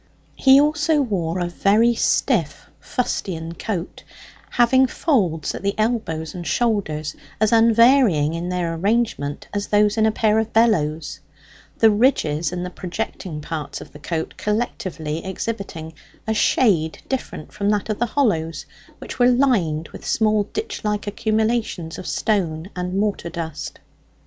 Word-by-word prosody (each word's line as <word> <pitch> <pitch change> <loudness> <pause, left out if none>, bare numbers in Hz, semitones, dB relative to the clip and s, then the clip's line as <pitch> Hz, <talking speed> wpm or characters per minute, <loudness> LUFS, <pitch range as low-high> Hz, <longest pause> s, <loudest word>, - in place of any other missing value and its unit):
He 270 0 +6
also 300 +1 +2
wore 185 - -1
a 175 - -1
very 210 +7 +3
stiff 185 - 0
fustian 170 -9 -3
coat, 180 0 -5 0.5
having 260 +2 +4
folds 185 - 0
at - - -6
the 200 +1 -1
elbows 215 -9 -1
and 175 -3 -6
shoulders 155 -10 -1 0.2
as 215 0 +2
unvarying 230 - +5
in 170 +2 -3
their 175 -2 -1
arrangement 190 -6 -1
as 205 0 -2
those 210 +1 +3
in 220 0 +4
a - - +3
pair 215 0 +2
of 220 0 -2
bellows: 160 -11 +1 0.6
the 225 -1 +6
ridges 170 - +2
and 180 0 -3
the 180 - -6
projecting 180 -4 -5
parts 155 0 -5
of - - -11
the 150 - -11
coat 160 +1 -3
collectively 185 -8 -3
exhibiting 190 -5 -5 0.3
a 220 - 0
shade 190 -7 +2
different 255 - -4
from 205 -1 -1
that 210 -1 0
of 215 -2 -3
the 240 - +1
hollows, 165 - 0 0.3
which - - -9
were 245 0 +6
lined 205 - +1
with - - -11
small 215 -2 +2
ditch 435 - -5
like 210 -1 -1
accumulations 215 -5 -1
of - - -7
stone 185 -4 -1
and 180 +1 -3
mortar 200 -4 -1
dust. 160 -2 -6
200 Hz, 145 wpm, -21 LUFS, 165-225 Hz, 0.6 s, He